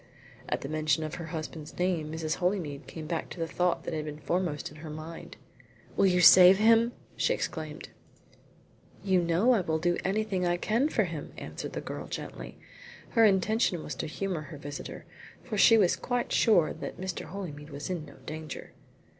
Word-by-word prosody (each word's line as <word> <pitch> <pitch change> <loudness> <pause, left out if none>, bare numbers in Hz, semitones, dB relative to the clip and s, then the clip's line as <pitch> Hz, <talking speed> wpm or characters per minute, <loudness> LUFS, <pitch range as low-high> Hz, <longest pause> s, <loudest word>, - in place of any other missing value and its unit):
At - - -1
the - - -5
mention 155 +1 +1
of 155 - -5
her 165 - -6
husband's 155 -1 -6
name 175 -4 0
Mrs. 160 -1 -2
Holymead 175 -6 -2
came 160 -2 -7
back 165 +1 -3
to - - -9
the 165 - 0
thought 180 +2 0
that - - -4
had 155 -1 -2
been 150 -1 -6
foremost 165 -2 -2
in 150 - -13
her 155 +1 -8
mind. 155 +2 -8 0.6
"Will 195 - +4
you 180 -1 +3
save 185 +1 +9
him?" 230 +2 +5 0.2
she - - +2
exclaimed. - - -5 1.1
"You 190 -2 +3
know 170 +8 +3
I 230 -6 +4
will 160 -2 0
do 175 +2 0
anything 195 -1 0
I 175 0 +1
can 230 - +1
for - - +2
him," - - -6
answered - - -6
the - - -3
girl - - -6
gently. - - -7 0.5
Her 230 -1 +5
intention 195 -2 +2
was 150 - -5
to - - -3
humour 180 +1 -3
her 155 0 -9
visitor, 145 0 -7 0.4
for 235 - -5
she 225 +2 +7
was 190 -5 +4
quite 245 -1 -2
sure 175 -9 +4
that - - -7
Mr. 185 -1 -4
Holymead 155 -6 -7
was 145 +4 -5
in 175 -4 -3
no 140 - -14
danger. 155 0 -7
175 Hz, 190 wpm, -29 LUFS, 155-195 Hz, 1.1 s, save